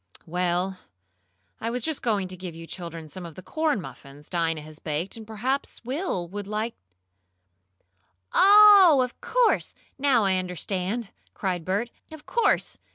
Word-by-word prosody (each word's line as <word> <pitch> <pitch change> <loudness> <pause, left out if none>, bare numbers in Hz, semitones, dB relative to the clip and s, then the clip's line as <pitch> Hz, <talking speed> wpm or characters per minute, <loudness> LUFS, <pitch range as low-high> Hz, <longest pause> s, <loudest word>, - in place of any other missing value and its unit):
"Well, 180 +2 -1 0.8
I 230 - -2
was 245 0 -3
just 315 -3 -2
going 205 -5 0
to 185 - -4
give 180 -2 -8
you 165 0 -9
children 165 -2 -7
some 180 +5 -8
of 165 -3 -9
the 185 - -10
corn 310 -7 0
muffins 145 -4 -11
Dinah 165 -3 0
has 155 0 -11
just - - -23
baked, 155 +5 -2
and 220 -2 -9
perhaps 245 +4 -3
Will 255 - -2
would 200 +2 -6
like 215 +2 -2 0.9
" - - -50 0.7
"Oh, 400 -7 +8
of 250 - -7
course! - - +1 0.2
Now 265 -6 +3
I 190 -1 +3
understand!" 185 +4 -3 0.2
cried 180 -4 -2
Bert. 205 +6 -1 0.2
"Of 315 -1 -11
course. 470 - +1
195 Hz, 160 wpm, -26 LUFS, 175-250 Hz, 0.9 s, Oh